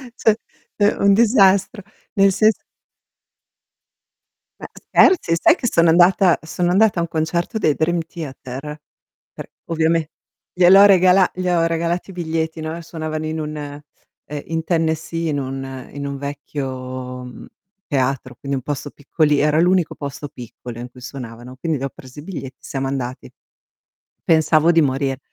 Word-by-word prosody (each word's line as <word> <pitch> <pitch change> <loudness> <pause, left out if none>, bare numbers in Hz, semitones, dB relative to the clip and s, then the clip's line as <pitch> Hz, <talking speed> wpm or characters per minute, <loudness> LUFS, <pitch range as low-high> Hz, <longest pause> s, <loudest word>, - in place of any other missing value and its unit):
Cioè, 220 -4 +2 0.4
è 205 - +3
un 200 0 +5
disastro, 205 -1 +3 0.3
nel 195 -2 +4
sens 215 +2 +3 2.0
Ma - - -8
scherzi? 325 - +3
Sai 330 - +5
che 250 - -3
sono 170 -6 +3
andata 180 +1 +5
sono 175 +2 -1
andata 200 -1 +3
a - - +1
un 170 - -3
concerto 170 +7 -2
dei 155 -8 +2
Dream 170 +2 0
Theater. 150 -2 -8 0.5
Per - - -9 0.2
ovviame 165 -1 0 0.4
gliel'ho 185 +3 +7
regala 185 -1 +5
gli 185 0 -2
ho 170 -2 +2
regalati 170 +3 -2
i - - -12
biglietti, 160 -2 -3
no, 160 +2 -5
suonavano 155 -1 -5
in 160 +1 -3
un 155 0 -4
ehm, 145 0 -7 0.6
in 165 0 -3
Tennessee, 165 0 -1
in 145 -2 -1
un 135 -1 -6
in 145 0 -6
un 140 0 -4
vecchio, 130 -3 -6
mhmm, 125 - -11 0.4
teatro, 130 -3 -1
quindi 140 0 -3
un 130 - -6
posto 145 +1 -4
piccoli 150 0 0
era 150 +1 +2
l'unico 180 -1 +2
posto 140 0 -6
piccolo 120 -1 -10
in 120 +1 -7
cui 125 +1 -16
suonavano, 125 -1 -9
quindi 155 +3 -2
gli - - -6
ho 135 - -2
presi 130 +3 -13
i - - -9
biglietti, 145 -8 -7
siamo 135 -1 -4
andati. 130 -2 -5 1.0
Pensavo 160 0 +4
di 165 - +4
morir, 135 -1 -1
160 Hz, 155 wpm, -20 LUFS, 135-175 Hz, 2.0 s, gliel'ho